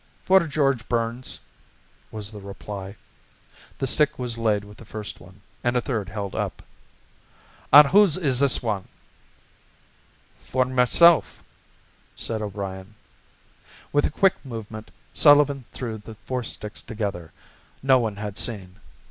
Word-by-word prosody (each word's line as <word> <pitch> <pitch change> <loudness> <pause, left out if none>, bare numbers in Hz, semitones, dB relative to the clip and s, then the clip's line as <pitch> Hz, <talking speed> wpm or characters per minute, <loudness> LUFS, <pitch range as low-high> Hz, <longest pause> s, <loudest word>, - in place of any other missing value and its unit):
"For 190 +1 +6
George 140 -5 0
Burns," 120 +1 -1 0.7
was 105 -1 -5
the 105 -2 -10
reply. 100 0 -8 0.8
The - - -2
stick 150 +3 +3
was 125 -2 -4
laid 110 -3 0
with 105 +1 -14
the - - -12
first 105 -1 -7
one, 95 +3 -17 0.2
and 120 0 +1
a - - +4
third 110 -8 -3
held 100 0 -5
up. - - -4 1.1
"An' 150 +2 +10
whose 190 +1 +5
is 140 -8 +1
this 140 -3 +2
wan?" 105 -5 -2 1.5
"For 130 0 0
myself," 130 +7 +4 0.7
said 110 -1 -3
O'Brien. 100 0 -6 1.0
With 145 - +3
a - - -2
quick 195 +4 +1
movement, 110 -4 -8 0.2
Sullivan 145 -3 +5
threw 115 -4 -5
the 110 +2 -11
four 130 -1 -2
sticks 105 -1 -2
together. 100 -7 -5 0.5
No 130 -1 +5
one 110 -4 -2
had 105 0 -5
seen. 95 -6 -4
115 Hz, 130 wpm, -24 LUFS, 105-135 Hz, 1.5 s, An